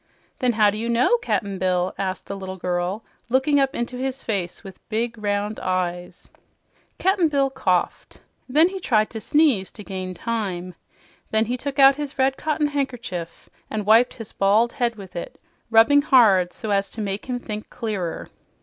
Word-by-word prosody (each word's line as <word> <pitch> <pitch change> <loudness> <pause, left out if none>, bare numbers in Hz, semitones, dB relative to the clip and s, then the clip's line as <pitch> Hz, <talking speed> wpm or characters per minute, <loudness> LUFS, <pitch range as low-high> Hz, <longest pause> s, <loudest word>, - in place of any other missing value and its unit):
"Then 250 -3 +2
how 210 -2 +4
do 210 - -5
you 230 +1 -3
know, 245 - +3
Cap'n 200 - -2
Bill?" 185 -1 0
asked 190 -1 -3
the 200 - -5
little 190 -1 -7
girl, 180 +4 -2 0.2
looking 265 +3 +3
up 270 +1 +1
into 240 +1 -3
his 265 +1 -3
face 195 -5 -3
with 195 -2 -11
big, 230 +2 -1
round 210 0 -2
eyes. 180 -1 -3 0.7
Cap'n 380 -2 +2
Bill 275 -3 +1
coughed. 185 -9 -1 0.3
Then 310 +6 +5
he 385 0 -6
tried 215 -10 +1
to 220 - -6
sneeze, 280 -11 +2
to 210 - -9
gain 185 -2 -5
time. 185 -4 -3 0.6
Then 220 +1 +2
he 245 +3 -2
took 280 +3 -5
out 275 0 +7
his 290 -3 -5
red 265 0 +2
cotton 305 +1 -1
handkerchief 245 - -4 0.2
and 215 -2 -3
wiped 225 +4 +5
his 225 -4 -6
bald 210 +4 +2
head 240 -2 0
with 190 -3 -12
it, 170 - -7 0.3
rubbing 230 +6 +6
hard 210 -11 +5
so 215 - -6
as 195 0 +1
to - - -9
make 200 +1 -3
him 250 -1 -2
think 215 -3 -6
clearer. 210 -8 -4
220 Hz, 175 wpm, -23 LUFS, 190-260 Hz, 0.7 s, out